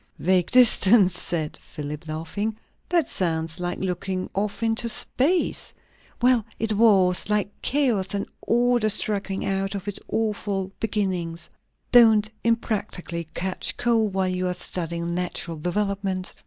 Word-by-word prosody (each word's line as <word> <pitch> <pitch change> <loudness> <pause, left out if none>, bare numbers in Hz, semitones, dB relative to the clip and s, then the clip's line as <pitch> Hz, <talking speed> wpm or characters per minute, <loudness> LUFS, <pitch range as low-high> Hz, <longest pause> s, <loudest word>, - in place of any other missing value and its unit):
"Vague 180 0 +2
distance?" 220 -6 +6
said 155 -3 -2
Philip, 150 +2 -7
laughing. 185 +8 -3 0.3
"That 340 -6 +2
sounds 160 -2 -2
like 175 0 -2
looking 185 0 -3
off 205 +3 -2
into 225 +1 +1
space." 310 +10 0 0.5
"Well, 250 -2 +4
it 220 -1 -1
was. 200 -4 +4
Like 210 -1 +1
chaos, 240 -9 +1
and 200 - -2 0.2
order 240 -1 +2
struggling 200 -2 0
out 195 +1 -1
of 200 0 -6
its 205 - -4
awful 205 -3 -2
beginnings." 185 -6 -2 0.4
"Don't 220 -3 +6
unpractically 205 -7 -1
catch 185 +1 -2
cold, 225 -4 +1
while 190 -1 +1
you 185 0 -1
are 180 - -1
studying 170 -1 -4
natural 175 -2 -3
developement." 195 +2 -2
195 Hz, 130 wpm, -24 LUFS, 180-220 Hz, 0.5 s, distance